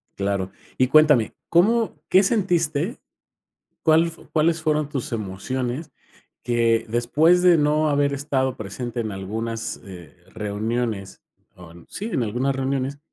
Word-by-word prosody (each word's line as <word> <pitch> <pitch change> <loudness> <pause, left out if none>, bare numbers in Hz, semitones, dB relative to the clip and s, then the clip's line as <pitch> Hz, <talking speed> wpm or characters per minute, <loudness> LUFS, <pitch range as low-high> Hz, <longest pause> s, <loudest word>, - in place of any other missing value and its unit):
Claro 100 -1 -2 0.3
y 130 - +3
cuéntame, 150 -5 +5 0.2
¿cómo 220 +7 +2
qué 190 +2 +6
sentiste? 175 - 0 0.9
¿Cuál 160 +1 +4
f 165 0 -8
cuáles 160 +1 +2
fueron 150 -1 +1
tus 135 -5 -4
emociones? 120 - -4 0.5
Que 115 -1 +1
después 150 +10 +3
de 180 -2 +6
no 150 +1 +2
haber 145 0 +2
estado 135 -2 -1
presente 120 +4 -5
en 110 -3 -3
algunas, 110 +4 -4
eh, 90 -2 -12 0.2
reuniones 105 -1 -3 0.3
on 85 -1 -14
sí, 210 - -5
en 135 - -1
algunas 125 +5 -1
reuniones. 135 +1 -2
130 Hz, 130 wpm, -23 LUFS, 110-155 Hz, 0.9 s, qué